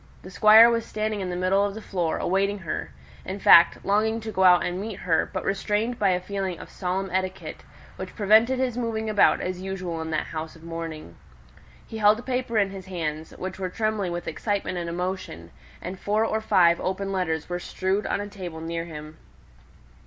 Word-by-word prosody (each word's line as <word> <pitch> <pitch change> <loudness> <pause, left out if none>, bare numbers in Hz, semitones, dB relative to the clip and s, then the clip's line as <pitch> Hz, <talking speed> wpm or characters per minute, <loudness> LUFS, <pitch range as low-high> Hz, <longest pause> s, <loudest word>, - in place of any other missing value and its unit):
The 185 - -10
Squire 215 +3 +8
was 230 -1 +1
standing 215 -2 -3
in 185 - -3
the 180 - -3
middle 185 +2 +2
of 205 0 -2
the - - -6
floor 175 -4 -1
awaiting 195 +2 0
her 160 - -5 0.3
in 190 +2 -5
fact, 170 -3 +6
longing 220 +3 +1
to 220 0 -5
go 190 -2 +1
out 180 -1 +6
and 180 +2 -3
meet 210 -2 -6
her, 165 -3 +1
but - - -4
restrained 210 +4 -1
by 200 - +3
a 180 -1 +2
feeling 190 -1 -4
of - - -11
solemn 190 0 -3
etiquette, 185 0 -3 0.4
which - - -7
prevented 220 +5 +4
his 255 -2 -1
moving 220 -2 -2
about 210 - +4
as 185 0 -4
usual 185 -3 -4
in 160 - -5
that 155 -1 -1
house 160 0 -6
of 165 - -16
mourning. 165 - -7 0.7
He 220 - -7
held 210 0 +5
a 235 - -8
paper 250 -3 -2
in 200 -2 +2
his 190 -1 -9
hands, 160 -4 -5
which 190 0 -6
were 185 -1 -2
trembling 215 -2 -1
with 175 0 -5
excitement 195 +1 -2
and 170 -1 -4
emotion; 180 - -5 0.3
and 185 +1 -6
four 215 +2 +1
or 220 0 -1
five 170 -5 +4
open 195 +1 -2
letters 160 -5 -1
were 175 0 -3
strewed 190 +3 -2
on - - -1
a 205 - -4
table 180 -5 -7
near 165 +1 -4
him. 155 -1 -10
190 Hz, 205 wpm, -25 LUFS, 175-210 Hz, 0.7 s, Squire